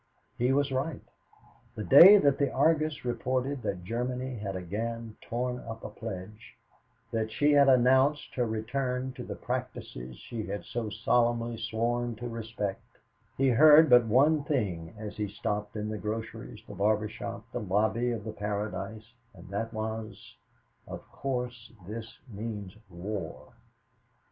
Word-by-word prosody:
He 125 +2 +1
was 140 0 +2
right. 135 +3 -2 0.7
The 105 - -4
day 180 - +10
that 140 -7 +3
the 140 -2 +1
Argus 155 0 +1
reported 130 +2 -1
that 90 -6 -3
Germany 125 +5 -3
had 100 -2 -4
again 110 +5 -4
torn 125 +1 -3
up 115 -1 -8
a - - -5
pledge, 105 0 -8 0.6
that 110 -1 -1
she 145 +7 +3
had 140 -1 +6
announced 130 +3 +4
her 125 -2 0
return 125 +3 -2
to - - -7
the - - -6
practices - - -5
she 110 -2 -6
had 100 +1 -5
so 115 -2 -3
solemnly 115 +1 +1
sworn 115 +2 -1
to 120 +3 -6
respect, 115 -4 -4 0.6
he 135 0 +3
heard 150 +4 +7
but 120 -2 +7
one 145 +6 +4
thing 100 - -2
as 105 -1 -7
he 105 -1 -1
stopped 105 +1 -3
in 105 0 -3
the 110 -1 -4
groceries, 110 +1 -5
the - - -8
barber 105 +1 +1
shop, 115 0 -7
the - - -3
lobby 110 +4 +1
of 115 -3 -4
the 110 0 -5
Paradise, 105 +2 -4 0.2
and 90 0 -13
that 110 +3 -3
was, 110 0 -6 0.5
"Of - - -8
course 125 -3 -4 0.2
this 110 +2 -7
means 105 -3 -6
war." 90 0 -6
115 Hz, 150 wpm, -29 LUFS, 105-125 Hz, 0.7 s, day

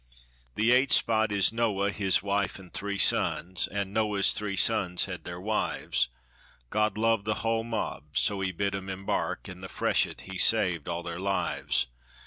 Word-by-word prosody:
The 110 +3 +3
'eight 130 +2 +4
spot' 110 -1 +3
is 100 +1 +2
Noah, 105 -4 +1
his 95 -2 +1
wife, 100 -1 -1
an' 90 -2 -14
three 100 0 -3
sons, 95 -1 +1
An' 100 -1 -3
Noah's 105 -2 +2
three 105 -2 -3
sons 95 -5 +2
had 90 -2 -7
their 90 0 -6
wives; 105 - 0 0.6
God 105 0 +1
loved 115 -2 +2
the 110 - 0
hull 115 0 +1
mob, 75 - -4
so 100 -1 +2
bid 100 +2 -1
'em 95 0 -4
emb 95 0 -6
ark - - -1
In 90 0 -9
the 95 - -7
freshet - - 0
he 95 -1 -7
saved 90 -8 +3
all 85 0 -3
their 85 0 -5
lives. 100 -8 0
100 Hz, 170 wpm, -28 LUFS, 95-110 Hz, 0.6 s, eight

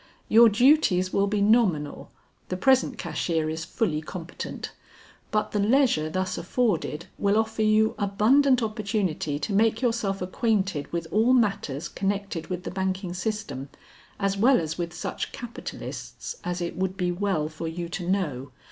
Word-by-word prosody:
your 230 +1 +7
duties 215 -6 +4
will 200 0 +2
be 205 0 0
nominal, 200 -9 +2 0.4
the 185 - -2
present 260 +2 +3
cashier 160 -2 -1
is 160 +1 -4
fully 170 -3 -1
competent; 170 +2 -7 0.6
but 215 0 0
the 210 - 0
leisure 215 - +3
thus 185 +2 -2
afforded 175 -6 -1
will 200 +1 +2
offer 220 0 0
you 215 0 +3
abundant 245 +6 +3
opportunity 200 -9 -1
to 200 +7 -3
make 220 +2 +3
yourself 225 -6 0
acquainted 190 - -1
with 170 -1 -2
all 225 +5 +4
matters 195 - +1
connected 195 -4 -3
with 180 -1 -4
the - - -5
banking 190 -1 -2
system 180 -9 -4 0.5
as 195 -1 +1
well 245 +7 +4
as 160 -1 -3
with 170 -1 -3
such 175 - -4
capitalists 240 - -7
as 180 0 -3
it 170 - -3
would 190 0 -2
be 180 -2 0
well 175 -4 0
for 155 +1 -6
you 170 +1 -4
to 175 +1 -4
know. 145 -10 -1
195 Hz, 155 wpm, -26 LUFS, 170-220 Hz, 0.6 s, your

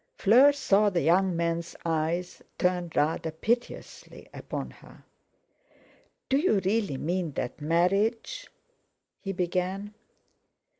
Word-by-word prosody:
Fleur 250 +8 +6
saw 210 -7 +2
the 180 -3 0
young 185 +2 +3
man's 170 0 -2
eyes 165 +2 -2 0.2
turn 180 -1 0
rather 160 +2 0
piteously 230 +10 -4
upon - - -6
her. - - -17 1.2
"Do 270 - +2
you 295 - +2
really 200 -8 0
mean 170 +1 -2
that 125 +4 -5
marriage—?" 185 +9 0 0.7
he 195 - -4
began. 185 +3 -2
180 Hz, 105 wpm, -27 LUFS, 170-205 Hz, 1.2 s, Fleur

